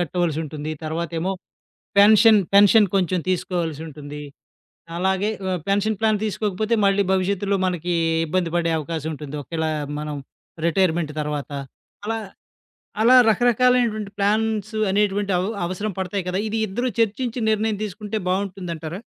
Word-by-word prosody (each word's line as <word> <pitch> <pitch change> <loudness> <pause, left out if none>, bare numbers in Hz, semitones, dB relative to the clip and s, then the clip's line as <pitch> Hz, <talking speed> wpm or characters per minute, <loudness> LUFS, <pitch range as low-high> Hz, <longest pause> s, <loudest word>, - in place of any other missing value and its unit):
కట్టవలసుంటుంది. 155 -3 -2
తర్వాతేమో 165 +3 -2 0.7
pension, 215 +1 +7 0.2
pension 205 +1 +7
కొంచెం 185 -1 +1
తీసుకోవాల్సుంటుంది, 160 -5 -3 0.8
అలాగే 190 +3 +1 0.2
ఆహ్, 180 - -1
పెన్షన్ 205 +2 +1
ప్లాన్ 215 -1 +3
తీసుకోకపోతే 215 +1 -1
మళ్ళీ 200 0 +3
భవిష్యత్తులో 195 +1 0
మనకి 175 -1 -1 0.3
ఇబ్బంది 170 +1 -1
పడే 170 -1 +1
అవకాశం 160 0 -4
ఉంటుంది. 150 -1 -7
ఒకేళ 160 +1 -3 0.3
మనం 150 -1 -4 0.5
రిటైర్మెంట్ 170 -2 +1
తర్వాత. 150 -1 -4 0.5
అలా, 225 +1 -1 0.8
అలా 250 +3 +7
రకరకాలైనటువంటి 240 -2 +2
ప్లాన్స్ 215 +1 0 0.2
అనేటువంటి 200 0 +1
అవ్ 185 +3 -1 0.2
అవసరం 195 +4 -3
పడతాయి 190 0 -2
కదా! 180 - -1
ఇది 220 +1 -2
ఇద్దరూ 240 +6 -2
చర్చించి 230 +3 0
నిర్ణయం 215 0 0
తీసుకుంటే 210 +2 -5
బావుంటుందంటారా? 180 -2 -3
190 Hz, 115 wpm, -22 LUFS, 165-210 Hz, 0.8 s, పెన్షన్